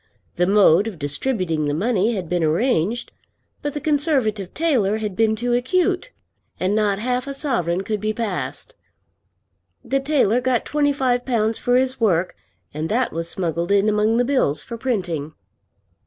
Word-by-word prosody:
The 175 Hz, +1 st, +1 dB
mode 200 Hz, -1 st, +5 dB
of 210 Hz, -6 st, -6 dB
distributing 155 Hz, -, -1 dB
the 145 Hz, -, 0 dB
money 220 Hz, +4 st, +1 dB
had 185 Hz, -4 st, -4 dB
been 175 Hz, 0 st, 0 dB
arranged; 200 Hz, +5 st, 0 dB, 0.5 s
but 290 Hz, -1 st, -4 dB
the -, -, -1 dB
Conservative 275 Hz, -, 0 dB
tailor 245 Hz, -11 st, +1 dB
had 210 Hz, -3 st, -4 dB
been 220 Hz, +1 st, +2 dB
too 240 Hz, +2 st, -1 dB
acute, 365 Hz, -, 0 dB, 0.5 s
and 185 Hz, +2 st, 0 dB
not 210 Hz, -2 st, +1 dB
half 250 Hz, +4 st, -2 dB
a 275 Hz, -, -4 dB
sovereign 190 Hz, -, -1 dB
could 210 Hz, 0 st, -3 dB
be 215 Hz, 0 st, 0 dB
passed. 225 Hz, -, -4 dB, 1.1 s
The 275 Hz, -, +1 dB
tailor 270 Hz, -5 st, +2 dB
got 255 Hz, -2 st, 0 dB
twenty 290 Hz, -1 st, +1 dB
five 255 Hz, -3 st, 0 dB
pounds 225 Hz, -3 st, 0 dB
for 245 Hz, -, +1 dB
his 260 Hz, -1 st, +1 dB
work, 180 Hz, -4 st, +1 dB, 0.4 s
and 155 Hz, +2 st, -3 dB
that 250 Hz, +4 st, 0 dB
was 165 Hz, +1 st, -4 dB
smuggled 170 Hz, 0 st, -2 dB
in 200 Hz, +1 st, +3 dB
among 215 Hz, +2 st, +2 dB
the 245 Hz, -, +2 dB
bills 250 Hz, -, +1 dB
for 235 Hz, -, -7 dB
printing. 180 Hz, -, -2 dB
220 Hz, 165 wpm, -21 LUFS, 185-255 Hz, 1.1 s, mode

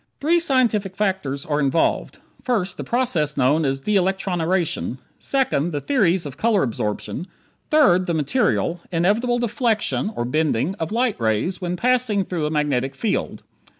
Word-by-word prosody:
Three 335 Hz, +4 st, +3 dB
scientific 235 Hz, -, +1 dB
factors 185 Hz, -9 st, -1 dB
are 150 Hz, -1 st, 0 dB
involved: 145 Hz, +3 st, 0 dB, 0.3 s
First, 215 Hz, -7 st, -1 dB
the -, -, -4 dB
process 180 Hz, -, 0 dB
known 145 Hz, +4 st, +3 dB
as 135 Hz, 0 st, -1 dB
de 210 Hz, +8 st, 0 dB
electroniration; 180 Hz, -6 st, 0 dB, 0.2 s
second, 250 Hz, -, 0 dB
the 145 Hz, -, -1 dB
theories 190 Hz, -, +1 dB
of 140 Hz, -3 st, -7 dB
color 220 Hz, -4 st, +2 dB
absorption; 115 Hz, -, -3 dB, 0.4 s
third, 190 Hz, -, +4 dB
the 170 Hz, -, 0 dB
material, 175 Hz, -, 0 dB
inevitable 210 Hz, +8 st, +1 dB
deflection 230 Hz, -3 st, 0 dB, 0.2 s
(bending) 155 Hz, +1 st, +1 dB
of 160 Hz, -, -3 dB
light 230 Hz, -, 0 dB
rays 115 Hz, -, 0 dB
when 180 Hz, 0 st, -2 dB
passing 235 Hz, -3 st, +1 dB
through 165 Hz, -5 st, -2 dB
a -, -, -2 dB
magnetic 145 Hz, -4 st, -1 dB
field. 225 Hz, -, -2 dB
185 Hz, 145 wpm, -22 LUFS, 150-230 Hz, 0.4 s, third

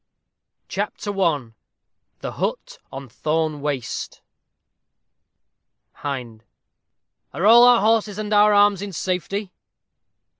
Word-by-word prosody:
CHAPTER 205 Hz, -, -4 dB
I 145 Hz, -10 st, 0 dB, 0.7 s
THE -, -, -4 dB
HUT -, -, -4 dB
ON 135 Hz, 0 st, -8 dB
THORNE 155 Hz, +4 st, -2 dB
WASTE 140 Hz, -4 st, -4 dB, 1.7 s
Hind. 125 Hz, -6 st, -6 dB, 0.9 s
Are 180 Hz, -, -1 dB
all 235 Hz, +3 st, +8 dB
our 245 Hz, -2 st, +6 dB
horses 215 Hz, -1 st, +1 dB
and 215 Hz, 0 st, -3 dB
our 210 Hz, 0 st, +5 dB
arms 205 Hz, -1 st, +4 dB
in 200 Hz, -1 st, -6 dB
safety? 185 Hz, +3 st, -3 dB
185 Hz, 100 wpm, -22 LUFS, 145-210 Hz, 1.7 s, all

